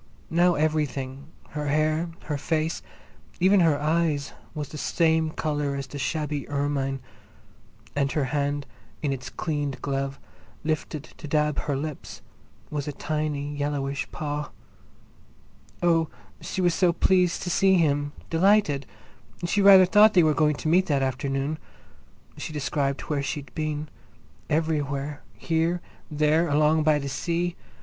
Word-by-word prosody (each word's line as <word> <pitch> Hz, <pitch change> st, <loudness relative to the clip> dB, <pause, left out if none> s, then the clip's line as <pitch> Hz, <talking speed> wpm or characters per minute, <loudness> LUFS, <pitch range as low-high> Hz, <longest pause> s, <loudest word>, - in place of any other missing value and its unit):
Now 175 Hz, +1 st, +4 dB
everything, 145 Hz, -3 st, -1 dB, 0.2 s
her 150 Hz, 0 st, -4 dB
hair, 155 Hz, +3 st, +1 dB
her 150 Hz, -, -2 dB
face, 160 Hz, +2 st, -1 dB, 0.6 s
even 190 Hz, +3 st, +5 dB
her 160 Hz, -5 st, +4 dB
eyes, 155 Hz, -2 st, 0 dB, 0.2 s
was 150 Hz, -2 st, -4 dB
the 155 Hz, -, -8 dB
same 160 Hz, 0 st, +2 dB
colour 150 Hz, -2 st, -2 dB
as 140 Hz, 0 st, -3 dB
the 145 Hz, +2 st, -8 dB
shabby 150 Hz, 0 st, -2 dB
ermine, 140 Hz, -2 st, -1 dB, 0.9 s
and 140 Hz, -1 st, +1 dB
her 150 Hz, -, +1 dB
hand, 145 Hz, 0 st, 0 dB, 0.4 s
in 140 Hz, -2 st, +1 dB
its 130 Hz, -1 st, -6 dB
cleaned 145 Hz, -4 st, -3 dB
glove, 135 Hz, -1 st, -2 dB, 0.4 s
lifted 155 Hz, -1 st, -2 dB, 0.2 s
to 155 Hz, -, -7 dB
dab 150 Hz, 0 st, +1 dB
her 145 Hz, -, -2 dB
lips, 150 Hz, 0 st, -6 dB, 0.5 s
was 145 Hz, -1 st, -3 dB
a -, -, -1 dB
tiny 145 Hz, -1 st, -2 dB
yellowish 145 Hz, -1 st, -2 dB
paw. 150 Hz, -1 st, -3 dB, 1.3 s
Oh, 165 Hz, -2 st, +3 dB, 0.3 s
she 190 Hz, -, -3 dB
was 175 Hz, -1 st, +3 dB
so 180 Hz, 0 st, +3 dB
pleased 180 Hz, +1 st, +2 dB
to 180 Hz, -, -2 dB
see 190 Hz, +2 st, +4 dB
him—delighted! 155 Hz, +1 st, +2 dB, 0.6 s
She 200 Hz, +4 st, +1 dB
rather 195 Hz, -1 st, +9 dB
thought 210 Hz, +3 st, +6 dB
they 175 Hz, -, +7 dB
were 155 Hz, -1 st, +4 dB
going 150 Hz, 0 st, +2 dB
to 155 Hz, -, -5 dB
meet 180 Hz, +4 st, +4 dB
that 140 Hz, -3 st, +2 dB
afternoon. 135 Hz, +3 st, -1 dB, 0.8 s
She -, -, -5 dB
described 140 Hz, -1 st, -1 dB
where 145 Hz, -2 st, -2 dB
she'd 140 Hz, -1 st, -5 dB
been—everywhere, 150 Hz, -1 st, -3 dB, 0.2 s
here, 165 Hz, +2 st, 0 dB, 0.3 s
there, 155 Hz, +2 st, +2 dB
along 150 Hz, +2 st, +3 dB
by 155 Hz, -1 st, +4 dB
the 140 Hz, -1 st, -3 dB
sea. 170 Hz, +6 st, -1 dB
150 Hz, 135 wpm, -26 LUFS, 145-165 Hz, 1.3 s, rather